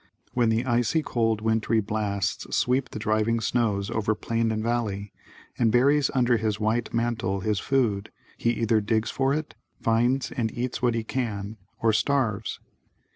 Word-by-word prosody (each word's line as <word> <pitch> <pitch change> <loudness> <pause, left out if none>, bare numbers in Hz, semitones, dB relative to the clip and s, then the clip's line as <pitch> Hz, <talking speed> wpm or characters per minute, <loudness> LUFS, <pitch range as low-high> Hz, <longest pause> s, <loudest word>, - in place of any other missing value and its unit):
When 120 -2 +2
the 115 +3 +1
icy 120 +5 +1
cold 115 -4 0
wintry 110 0 +1
blasts 105 -2 -2
sweep 130 +1 +1
the - - -7
drifting 110 +2 +1
snows 105 -3 0
over 110 -1 0
plain 115 +1 -1
and 110 0 -2
valley 105 -4 -2 0.5
and 115 -3 +3
buries 140 +5 +4
under 120 -2 +3
his 110 -1 -1
white 110 +2 0
mantle 115 -5 -1
his 105 +1 0
food 115 -8 0 0.3
he 115 - 0
either 115 -2 +2
digs 110 +2 0
for 135 0 +1
it, 155 +1 -2 0.3
finds 120 +2 +1
and 110 -3 -1
eats 125 +1 -2
what 120 -2 +2
he 115 - -1
can, 110 -4 -3 0.3
or 110 -1 +4
starves. 115 -4 0
115 Hz, 160 wpm, -26 LUFS, 110-120 Hz, 0.5 s, buries